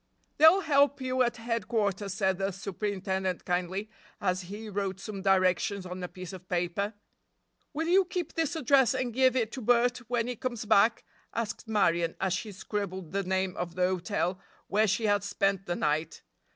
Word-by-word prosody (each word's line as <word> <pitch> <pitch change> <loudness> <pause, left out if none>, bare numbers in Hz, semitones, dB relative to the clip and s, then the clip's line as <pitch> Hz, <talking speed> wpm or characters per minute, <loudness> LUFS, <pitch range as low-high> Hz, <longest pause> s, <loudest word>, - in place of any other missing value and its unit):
"They'll 320 +6 +8
help 285 -3 +3
you 255 0 0
at 240 -1 +1
headquarters," 220 -4 -1
said 190 -3 +1
the 195 0 0
superintendent 190 -1 -3
kindly, 185 +4 -2 0.3
as 185 -3 0
he 205 +5 -8
wrote 195 -2 -3
some 200 -1 -6
directions 190 0 +2
on 180 0 -6
a 180 - -3
piece 185 +1 -9
of 185 -1 -11
paper. 180 +4 -1 0.8
"Will 320 +1 -2
you 375 +2 +5
keep 355 -1 -4
this 325 0 -1
address 270 -4 +4
and 255 -2 -2
give 260 +1 +4
it 230 -3 0
to 265 - -6
Bert 245 +2 +3
when 240 -2 +1
he 250 0 -3
comes 240 -2 -4
back?" 220 +2 +4 0.3
asked 230 0 -3
Marion, 170 -6 +2
as 190 -2 0
she 210 +3 -3
scribbled 190 -3 -4
the 200 - 0
name 190 0 -1
of 175 -1 -4
the 180 0 +2
hotel 185 0 -1 0.3
where 215 +2 +2
she 215 +3 +1
had 205 -1 +2
spent 195 -1 0
the 175 - -1
night. 155 +1 -1
200 Hz, 180 wpm, -29 LUFS, 185-235 Hz, 0.8 s, They'll